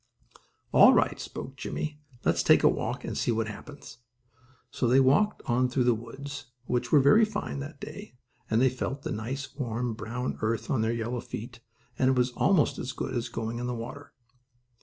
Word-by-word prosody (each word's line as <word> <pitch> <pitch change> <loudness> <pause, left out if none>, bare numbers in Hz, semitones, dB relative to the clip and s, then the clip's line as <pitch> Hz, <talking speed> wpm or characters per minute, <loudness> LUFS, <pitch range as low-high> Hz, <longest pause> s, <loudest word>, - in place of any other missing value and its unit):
"All - - +8
right," - - +2
spoke 135 +1 -7
Jimmie, 150 +3 -4 0.2
"let's - - +3
take - - +5
a - - +7
walk, - - -1
and - - -4
see - - -1
what 115 -1 +1
happens." 130 +2 -10 0.7
So 125 - 0
they 130 +3 +5
walked 145 +11 +3
on 125 +1 +2
through 125 0 +1
the 120 0 +4
woods, 135 +6 -7 0.2
which 120 0 -1
were 150 - +7
very 140 +12 +6
fine 210 -9 -2
that 145 +1 -7
day, 180 +4 -9 0.3
and 110 - +3
they 130 +1 +5
felt 135 +2 -4
the - - -3
nice, 130 +5 -4
warm, 120 -3 -2
brown 125 +3 -4
earth 115 0 -1
on 130 -5 +2
their 110 +1 +1
yellow 115 +1 -2
feet, 115 +1 -8 0.4
and 130 - +4
it 130 - +3
was 125 0 +2
almost 175 +4 +2
as 130 - -4
good - - -4
as 120 0 -2
going 115 0 -4
in 125 - -3
the 125 - -2
water. 130 +5 -8
125 Hz, 195 wpm, -28 LUFS, 115-140 Hz, 0.7 s, All